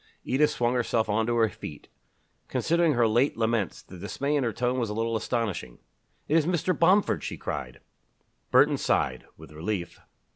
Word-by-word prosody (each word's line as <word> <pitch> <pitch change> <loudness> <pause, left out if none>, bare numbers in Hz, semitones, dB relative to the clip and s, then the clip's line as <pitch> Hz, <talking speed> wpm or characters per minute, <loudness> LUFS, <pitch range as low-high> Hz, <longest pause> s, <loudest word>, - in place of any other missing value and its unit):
Edith 150 +4 +2
swung 120 -4 0
herself 115 -3 0
on 110 +2 +1
to 120 - +1
her 115 -1 +4
feet. 75 -7 -9 0.6
Considering 170 -1 +2
her 120 -2 +3
late 120 +6 +2
laments, 115 -4 -1
the 90 - -12
dismay 140 +9 -2
in 145 - +1
her 115 - 0
tone 125 +4 -1
was 115 -3 -1
a 105 - -4
little 115 +1 -1
astonishing. 105 - -2 0.5
"It 155 - +1
is 160 -1 +2
Mr. 180 0 +1
Bomford!" 190 +4 +3
she - - -5
cried. 65 -4 -5 0.7
Burton - - +5
sighed - - 0
with 80 0 -13
relief. 85 +3 -4
115 Hz, 175 wpm, -27 LUFS, 105-140 Hz, 0.7 s, Burton